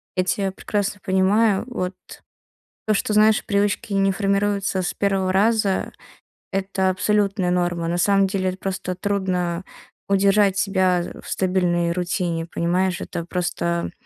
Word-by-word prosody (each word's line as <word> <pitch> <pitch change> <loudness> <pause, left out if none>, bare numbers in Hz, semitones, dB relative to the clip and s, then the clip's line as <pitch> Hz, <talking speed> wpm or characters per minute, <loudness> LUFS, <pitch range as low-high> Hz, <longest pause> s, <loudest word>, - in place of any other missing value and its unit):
Я 185 - +2
тебя 195 +1 -1
прекрасно 205 0 -3
понимаю, 195 +3 +2
вот. 190 -7 -3 0.9
То, 215 - +2
что, 210 - -1
знаешь, 215 0 +4
привычки 205 0 0
не 195 0 +2
формируются 200 -1 0
с 175 - -2
первого 195 -2 0
раза- 205 -1 +1 0.6
это 190 0 0
абсолютная 195 -1 +1
норма. 175 -2 0
На 175 +1 -1
самом 195 +1 +3
деле 190 -1 -1
это 185 - -5
просто 185 -1 -4
трудно 185 -2 -1 0.4
удержать 200 0 +3
себя, 190 -3 +2
э, - - -9
в - - -14
стабильной 175 -2 +1
рутине, 175 -1 -2
понимаешь? 175 +2 0
Это 170 - -5
просто 170 -1 -2
190 Hz, 135 wpm, -22 LUFS, 180-200 Hz, 0.9 s, знаешь